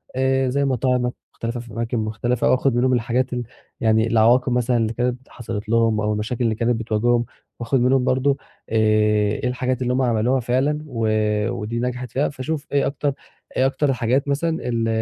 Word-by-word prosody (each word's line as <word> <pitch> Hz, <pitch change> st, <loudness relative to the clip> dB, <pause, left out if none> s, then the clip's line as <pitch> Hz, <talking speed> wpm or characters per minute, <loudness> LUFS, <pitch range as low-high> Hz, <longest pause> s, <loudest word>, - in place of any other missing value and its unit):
آآ 130 Hz, 0 st, +1 dB
زي 140 Hz, +2 st, +1 dB
مطاعم 125 Hz, -1 st, +1 dB, 0.2 s
مختلفة 115 Hz, +1 st, -4 dB
في 120 Hz, -1 st, -10 dB
أماكِن 115 Hz, +1 st, -2 dB
مختلف، 110 Hz, +2 st, -2 dB
أو -, -, +4 dB
آخُد 130 Hz, 0 st, +2 dB
منهم 130 Hz, +1 st, +2 dB
الحاجات 125 Hz, +2 st, 0 dB
ال 120 Hz, -1 st, -2 dB, 0.4 s
يعني 110 Hz, -1 st, +3 dB
العواقب 120 Hz, +3 st, +4 dB
مثلًا 125 Hz, 0 st, +1 dB
اللي 115 Hz, 0 st, 0 dB
كانت 125 Hz, +2 st, -2 dB
حصلت 105 Hz, -3 st, -6 dB
لهم 115 Hz, -2 st, +2 dB
أو 105 Hz, 0 st, 0 dB
المشاكل 110 Hz, +4 st, -2 dB
اللي 110 Hz, -2 st, +1 dB
كانت 120 Hz, +1 st, +1 dB
بتواجههم، 120 Hz, +2 st, +1 dB, 0.3 s
وآخد 120 Hz, +3 st, 0 dB
منهم 125 Hz, +1 st, +3 dB
برضه 130 Hz, +2 st, +2 dB, 0.3 s
آآ 115 Hz, -, -3 dB, 0.7 s
إيه -, -, +1 dB
الحاجات 125 Hz, 0 st, -1 dB
اللي 125 Hz, 0 st, 0 dB
هُم 130 Hz, -, +1 dB
عملوها 120 Hz, +1 st, +2 dB
فعلًا، 130 Hz, +5 st, 0 dB
و 115 Hz, -4 st, -2 dB, 0.4 s
ودي 115 Hz, 0 st, -3 dB
نجَحت 125 Hz, 0 st, -3 dB
فيها، 140 Hz, +3 st, 0 dB
فاشوف 145 Hz, +2 st, -4 dB
إيه 140 Hz, -1 st, +2 dB
أكتر 140 Hz, 0 st, -1 dB, 0.4 s
إيه 130 Hz, -, +3 dB
اكتر 135 Hz, +1 st, +1 dB
حاجات 125 Hz, +4 st, 0 dB
مثلًا 145 Hz, +4 st, 0 dB, 0.2 s
ال 115 Hz, -1 st, 0 dB
125 Hz, 185 wpm, -22 LUFS, 115-130 Hz, 0.7 s, أو